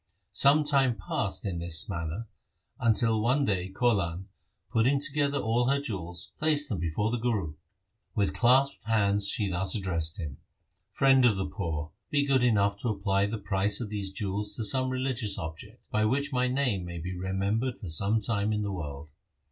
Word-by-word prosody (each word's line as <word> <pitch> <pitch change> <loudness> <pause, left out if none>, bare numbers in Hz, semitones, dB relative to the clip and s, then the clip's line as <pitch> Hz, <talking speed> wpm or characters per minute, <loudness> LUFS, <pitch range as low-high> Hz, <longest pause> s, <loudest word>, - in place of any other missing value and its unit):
Some 140 +9 +5
time 135 -4 +3
passed 100 +1 -3
in 90 -4 -2
this 85 -1 +1
manner, 85 +4 -4 0.5
until 110 -1 +2
one 130 +5 +2
day 95 -5 -1
Kaulan, 95 -5 0 0.5
putting 130 +5 +3
together 145 0 +1
all 120 +1 +1
her 140 +1 +2
jewels, 90 - -5
placed 150 -2 +2
them 105 - -2
before 85 +7 -1
the 120 - -1
Guru. 110 -10 -1 0.6
With 100 -2 +1
clasped 130 +2 +3
hands 100 -2 +2
she 105 -1 -1
thus 95 +2 -2
addressed 85 -6 -1
him, 75 -6 -5 0.3
' - - -41
Friend 135 -1 +5
of 115 -5 +4
the 95 - -1
poor, 80 -6 -4 0.2
be 145 -1 +2
good 135 -3 +2
enough 100 -4 +3
to 120 - -2
apply 100 -1 +1
the 110 +2 -3
price 100 0 +1
of 115 -4 -4
these 100 -2 -3
jewels 100 +1 -3
to 115 - -2
some 130 +5 +1
religious 130 -5 -2
object, 95 +6 -8
by 110 0 +2
which 140 +5 0
my 125 0 +2
name 125 -7 0
may 85 -1 -6
be 90 +3 -5
remembered 100 +7 -1
for 100 - -8
some 100 +7 +2
time 105 -2 0
in 105 -1 0
the 100 - -2
world.' 75 -4 -6
105 Hz, 180 wpm, -28 LUFS, 95-125 Hz, 0.6 s, Some